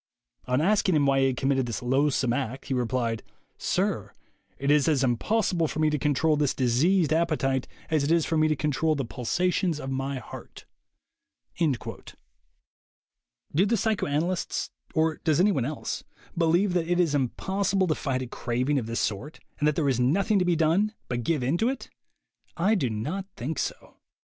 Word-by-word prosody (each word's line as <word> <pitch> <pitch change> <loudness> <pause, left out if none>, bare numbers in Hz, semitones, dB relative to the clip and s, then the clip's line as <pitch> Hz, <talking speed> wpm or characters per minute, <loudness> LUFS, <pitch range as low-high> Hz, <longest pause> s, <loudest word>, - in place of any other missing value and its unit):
On 125 +3 +2
asking 190 0 +3
him 145 -2 +3
why 135 0 +3
he 135 - +4
had 130 -2 -1
committed 135 -1 +1
this 115 0 -4
loathsome 130 -1 +2
act, 130 0 -3
he 135 - -2
replied: 120 -2 -1 0.4
'Sir, - - -1 0.4
it 140 +1 +1
is 150 0 +4
as 145 -4 +2
impossible 170 - +1
for - - -6
me 155 0 +2
to 150 - 0
control 150 +1 +2
this 145 -2 +1
diseased 150 +7 +2
appetite 150 -6 +1 0.2
as 155 -3 +2
it 145 - 0
is 165 -2 +3
for 165 - -1
me 155 0 +4
to 155 - +1
control 150 +2 0
the 135 -3 -2
pulsations 175 +7 0
of 135 -2 -5
my 135 +1 -2
heart.' 125 - -10 0.5
" - - -40
Do 155 -6 +3 1.9
the 230 +2 +2
psychoanalysts, 180 -5 -1 0.2
or 160 0 +2
does 155 -1 +1
anyone 180 - +3
else, 150 +2 -4 0.3
believe 175 +3 +2
that 170 -2 0
it 175 0 +1
is 170 -5 +2
impossible 190 +8 0
to 165 - +1
fight 130 -4 -2
a - - -6
craving 125 +4 -1
of 115 - -5
this 115 0 -2
sort, 120 +10 -3 0.2
and 150 - +2
that 150 - +2
there 150 -2 +1
is 130 -3 +1
nothing 195 - +2
to 180 - +1
be 175 -1 +2
done 170 +7 +2
but 120 -1 -1
give 145 +2 0
in 140 +8 0
to 230 - +2
it? 270 - -5 0.7
I 190 +6 +3
do 145 - +1
not 150 - -3
think 140 +6 -4
so. - - -5
150 Hz, 185 wpm, -27 LUFS, 130-170 Hz, 1.9 s, he